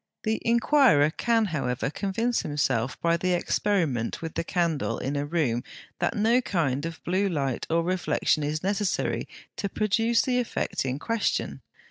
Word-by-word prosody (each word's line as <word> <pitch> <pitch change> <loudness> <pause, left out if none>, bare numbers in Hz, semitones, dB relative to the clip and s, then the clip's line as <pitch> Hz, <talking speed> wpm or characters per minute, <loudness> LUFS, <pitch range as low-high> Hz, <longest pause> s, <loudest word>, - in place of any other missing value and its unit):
The 220 0 -1
inquirer 235 - +4
can, 230 +4 +1
however, 135 -2 -1
convince 225 +7 -1
himself, 130 -5 -1
by 170 0 +2
the 180 +1 0
experiment 170 - 0
with 165 -1 -6
the - - -2
candle 170 -4 0
in 140 +2 -3
a 145 0 -1
room, 145 -8 0 0.4
that - - 0
no 230 +4 +3
kind 155 - -1
of 165 -1 -9
blue 190 +3 +1
light 140 -7 -2
or 165 +1 +2
reflection 180 -3 +1
is 150 +2 -2
necessary 200 0 -1 0.3
to 200 - -2
produce 225 +3 +2
the 250 -1 +1
effect 240 - -2
in 130 0 -1
question. 230 +8 -1
170 Hz, 155 wpm, -26 LUFS, 145-215 Hz, 0.4 s, inquirer